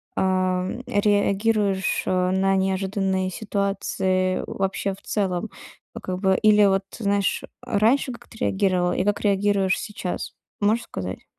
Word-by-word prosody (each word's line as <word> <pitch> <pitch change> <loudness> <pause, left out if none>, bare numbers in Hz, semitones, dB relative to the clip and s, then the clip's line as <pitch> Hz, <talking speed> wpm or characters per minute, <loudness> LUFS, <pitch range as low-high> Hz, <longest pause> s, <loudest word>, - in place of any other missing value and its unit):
ам, 185 +3 0
реагируешь, 205 -1 +1
а, 185 0 +1
на 195 +1 +2
неожиданные 190 0 0
ситуации 190 -2 -1
вообще 195 0 -2
в 195 - -14
целом? 195 0 -2 0.5
Вот - - -8
как 185 0 -3
бы 190 -1 +2
или 210 -1 +5
вот 195 0 +2 0.2
знаешь, 200 -2 0 0.2
а 205 - -1
раньше 255 +5 +3
как 235 - -13
ты 225 - -14
реагировал 185 -3 +1
и - - 0
как 205 0 0
реагируешь 200 -2 +2
сейчас, 190 -4 -5 0.3
можешь 220 +3 +2
сказать? 95 -1 -6
195 Hz, 135 wpm, -24 LUFS, 185-205 Hz, 0.5 s, или